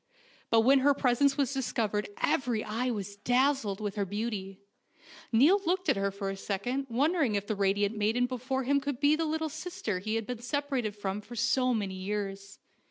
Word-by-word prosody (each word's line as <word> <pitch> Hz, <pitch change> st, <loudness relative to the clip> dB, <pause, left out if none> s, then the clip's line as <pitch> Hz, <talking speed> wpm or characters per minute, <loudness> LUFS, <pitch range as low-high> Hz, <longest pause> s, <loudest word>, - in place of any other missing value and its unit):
But 225 Hz, -, +5 dB
when 270 Hz, +4 st, +5 dB
her 280 Hz, +1 st, +4 dB
presence 275 Hz, +1 st, +2 dB
was 275 Hz, -1 st, +1 dB
discovered 220 Hz, -6 st, -1 dB
every 245 Hz, -5 st, +1 dB
eye 230 Hz, +4 st, -2 dB
was 200 Hz, -3 st, -4 dB
dazzled 245 Hz, -2 st, +1 dB
with 205 Hz, -2 st, -3 dB
her 200 Hz, -, +1 dB
beauty. 200 Hz, -1 st, -4 dB, 0.7 s
Niall 300 Hz, -, +5 dB
looked 370 Hz, +1 st, 0 dB
at -, -, +4 dB
her 200 Hz, 0 st, 0 dB
for 195 Hz, 0 st, -4 dB
a -, -, -5 dB
second, 245 Hz, +8 st, -3 dB
won 270 Hz, +7 st, +2 dB
dering 285 Hz, -, +1 dB
if 200 Hz, 0 st, -1 dB
the 215 Hz, -, -2 dB
radiant 200 Hz, +1 st, +1 dB
maiden 220 Hz, +4 st, +1 dB
before 255 Hz, +1 st, -2 dB
him 280 Hz, +2 st, +2 dB
could 285 Hz, -3 st, -3 dB
be 290 Hz, +1 st, +4 dB
the 325 Hz, +1 st, -1 dB
little 315 Hz, +1 st, -1 dB
sister 310 Hz, -, -4 dB
he 215 Hz, +4 st, -2 dB
had 225 Hz, -1 st, -1 dB
been 245 Hz, 0 st, -5 dB
separated 255 Hz, -4 st, -2 dB
from 205 Hz, 0 st, -3 dB
for 240 Hz, +3 st, -11 dB
so 255 Hz, +2 st, +2 dB
many 205 Hz, -5 st, -1 dB
years. 195 Hz, 0 st, -4 dB
230 Hz, 195 wpm, -30 LUFS, 205-275 Hz, 0.7 s, But